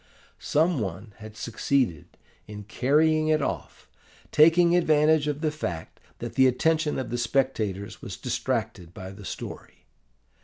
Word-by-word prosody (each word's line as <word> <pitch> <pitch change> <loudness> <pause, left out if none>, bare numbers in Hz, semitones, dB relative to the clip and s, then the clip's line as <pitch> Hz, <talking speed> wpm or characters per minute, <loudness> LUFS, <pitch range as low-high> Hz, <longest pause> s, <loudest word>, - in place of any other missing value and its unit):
Some 160 0 +1
one 100 +1 -5
had 110 0 -11
succeeded 115 - -1 0.3
in 105 0 -8
carrying 155 +8 +2
it 155 0 +3
off, 140 - -5 0.4
taking 170 +3 +5
advantage 155 -2 +3
of 150 0 -2
the 155 -2 +1
fact 90 - -6 0.2
that - - -6
the 130 0 +5
attention 155 +4 +1
of 125 -4 -4
the 120 - -2
spectators 115 -6 -1
was - - -7
distracted 85 0 -3
by 95 -2 -8
the 100 0 -11
story. - - -8
130 Hz, 140 wpm, -26 LUFS, 105-155 Hz, 0.4 s, taking